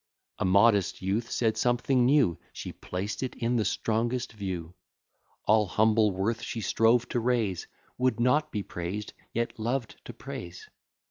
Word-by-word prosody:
A -, -, 0 dB
modest 100 Hz, 0 st, +3 dB
youth 105 Hz, +5 st, -1 dB
said 110 Hz, -2 st, 0 dB
something 125 Hz, +1 st, +2 dB
new; 130 Hz, -, +3 dB
She -, -, -6 dB
placed 95 Hz, +3 st, -4 dB
it 130 Hz, -, -3 dB
in 120 Hz, 0 st, 0 dB
the 110 Hz, -, +2 dB
strongest 115 Hz, +6 st, -1 dB
view. 90 Hz, -5 st, -5 dB, 0.7 s
All 105 Hz, -1 st, +4 dB
humble 110 Hz, +2 st, +3 dB
worth 100 Hz, +5 st, -1 dB
she 115 Hz, -, -4 dB
strove 115 Hz, +3 st, +3 dB
to 120 Hz, -, 0 dB
raise, 115 Hz, -6 st, 0 dB, 0.3 s
Would 125 Hz, -3 st, +1 dB
not 125 Hz, +6 st, +2 dB
be 105 Hz, -3 st, -2 dB
praised, 90 Hz, +5 st, -5 dB, 0.2 s
yet 115 Hz, 0 st, -2 dB
loved 120 Hz, +1 st, -2 dB
to -, -, -8 dB
praise. 85 Hz, +1 st, -8 dB
110 Hz, 150 wpm, -28 LUFS, 100-120 Hz, 0.7 s, All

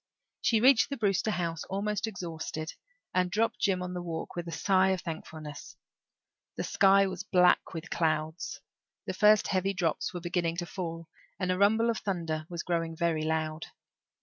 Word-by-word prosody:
She 230 Hz, -2 st, +3 dB
reached 255 Hz, -1 st, +6 dB
the 280 Hz, -, -3 dB
Brewster 205 Hz, -1 st, +1 dB
house, 170 Hz, -5 st, -2 dB
almost 205 Hz, +2 st, -2 dB
exhausted, 165 Hz, -5 st, -5 dB, 0.4 s
and 180 Hz, -1 st, +2 dB
dropped 220 Hz, +5 st, 0 dB
Jims 185 Hz, -3 st, +1 dB
on 180 Hz, 0 st, -5 dB
the 180 Hz, -, -3 dB
walk 165 Hz, -2 st, -5 dB
with 175 Hz, -1 st, -4 dB
a -, -, -4 dB
sigh 190 Hz, +1 st, +3 dB
of 190 Hz, -2 st, 0 dB
thankfulness. 155 Hz, -2 st, -7 dB, 0.8 s
The -, -, -1 dB
sky 195 Hz, -1 st, +5 dB
was 190 Hz, -1 st, -4 dB
black 180 Hz, -2 st, +3 dB
with 165 Hz, +1 st, -6 dB
clouds; 155 Hz, 0 st, -1 dB, 0.4 s
the -, -, -3 dB
first 210 Hz, 0 st, +5 dB
heavy 195 Hz, +1 st, 0 dB
drops 170 Hz, -4 st, 0 dB
were 175 Hz, -, -5 dB
beginning 170 Hz, -1 st, -1 dB
to 175 Hz, -, -2 dB
fall; 165 Hz, -2 st, -5 dB, 0.3 s
and 185 Hz, -1 st, 0 dB
the 185 Hz, -, 0 dB
rumble 220 Hz, +3 st, +4 dB
of 225 Hz, -, -3 dB
thunder 165 Hz, -5 st, -3 dB
was 170 Hz, -1 st, -4 dB
growing 165 Hz, -2 st, -1 dB
very 165 Hz, -2 st, +1 dB
loud. 155 Hz, 0 st, -2 dB
180 Hz, 175 wpm, -29 LUFS, 165-195 Hz, 0.8 s, reached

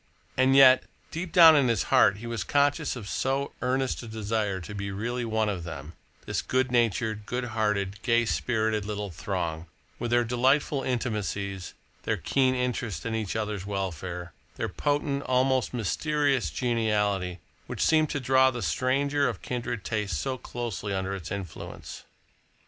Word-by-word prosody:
And 130 Hz, +1 st, +4 dB
yet, 130 Hz, -1 st, +8 dB, 0.3 s
deep 170 Hz, +1 st, -4 dB
down 165 Hz, -3 st, +9 dB
in 140 Hz, -3 st, +4 dB
his 115 Hz, -5 st, +1 dB
heart 100 Hz, -, +6 dB
he 115 Hz, -, -9 dB
was 115 Hz, -2 st, -3 dB
conscious 145 Hz, +1 st, +1 dB
of 110 Hz, -5 st, -7 dB
so 135 Hz, +5 st, -1 dB
earnest 130 Hz, +1 st, 0 dB
a 120 Hz, -, -9 dB
desire 110 Hz, -3 st, -2 dB
to 95 Hz, +4 st, -8 dB
be 100 Hz, -1 st, -4 dB
really 120 Hz, +5 st, -3 dB
one 110 Hz, -1 st, 0 dB
of 95 Hz, -5 st, -2 dB
them, 80 Hz, -1 st, -7 dB, 0.3 s
this -, -, -1 dB
good 130 Hz, 0 st, 0 dB
natured, 110 Hz, -3 st, +1 dB
good 125 Hz, 0 st, -2 dB
hearted, 105 Hz, -2 st, -1 dB
gay 120 Hz, -1 st, +2 dB
spirited 110 Hz, -2 st, 0 dB
little 105 Hz, -1 st, -4 dB
throng, 85 Hz, -2 st, -3 dB, 0.3 s
with 120 Hz, -, -2 dB
their 120 Hz, 0 st, +3 dB
delightful 130 Hz, +4 st, +2 dB
intimacies, 105 Hz, -7 st, -3 dB, 0.3 s
their -, -, -1 dB
keen 130 Hz, -1 st, +1 dB
interest 125 Hz, -8 st, -2 dB
in 115 Hz, -, -2 dB
each 110 Hz, -3 st, -2 dB
other's 105 Hz, -3 st, -3 dB
welfare, 90 Hz, -3 st, -4 dB, 0.2 s
their -, -, -2 dB
potent, 145 Hz, -1 st, -1 dB
almost 130 Hz, -1 st, +1 dB
mysterious 140 Hz, -, 0 dB
geniality, 105 Hz, -7 st, 0 dB, 0.3 s
which -, -, -1 dB
seemed 155 Hz, -2 st, +3 dB
to 145 Hz, -, -2 dB
draw 130 Hz, 0 st, +4 dB
the 120 Hz, -3 st, -4 dB
stranger 140 Hz, +5 st, +1 dB
of -, -, -7 dB
kindred 120 Hz, -3 st, -3 dB
tastes 105 Hz, -7 st, -2 dB
so 130 Hz, -, -2 dB
closely 115 Hz, -5 st, -4 dB
under 95 Hz, +1 st, -2 dB
its 90 Hz, -3 st, -6 dB
influence. 95 Hz, -4 st, -7 dB
115 Hz, 160 wpm, -27 LUFS, 100-130 Hz, 0.3 s, down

